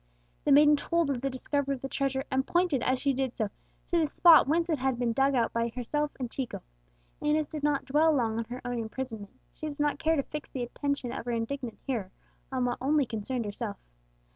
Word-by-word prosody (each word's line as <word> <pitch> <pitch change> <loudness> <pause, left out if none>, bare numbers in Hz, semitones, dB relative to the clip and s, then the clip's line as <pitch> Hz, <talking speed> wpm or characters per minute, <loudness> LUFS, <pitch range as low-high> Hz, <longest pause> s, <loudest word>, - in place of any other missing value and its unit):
The 290 - +3
maiden 295 +1 +7
told 335 0 0
of 250 -3 -2
the 275 - 0
discovery 275 +1 -1
of 255 - -12
the - - -1
treasure, 270 -1 -1
and 265 0 +2
pointed, 345 -7 +2
as 260 - +2
she 275 +1 +1
did 260 -1 -2
so, 215 -3 -1 0.4
to 345 - +4
the 315 - +2
spot 330 +1 +7
whence 330 +3 +2
it 315 -5 0
had 260 -1 0
been 240 -1 0
dug 270 +3 +3
out 235 -2 +1
by 230 0 +1
herself 295 +4 -1
and 255 - -2
Chico. 265 -3 -4 0.6
Inez 300 0 +1
did 305 - -6
not 290 -2 +1
dwell 300 +4 +4
long 230 -6 +1
on 230 - -2
her 245 +3 -7
own 245 -1 -2
imprisonment; 225 -2 -6
she 310 - -6
did 290 -1 -7
not 295 0 +1
care 325 0 +2
to 280 - +1
fix 300 +2 -7
the 255 - -4
attention 280 0 -2
of - - -5
her 245 - -2
indignant 235 +1 -3
hearer 230 -9 -2 0.4
on 255 -1 0
what 245 -1 -1
only 285 +1 +3
concerned 230 +1 -3
herself. 205 0 -4
270 Hz, 225 wpm, -29 LUFS, 245-295 Hz, 0.6 s, maiden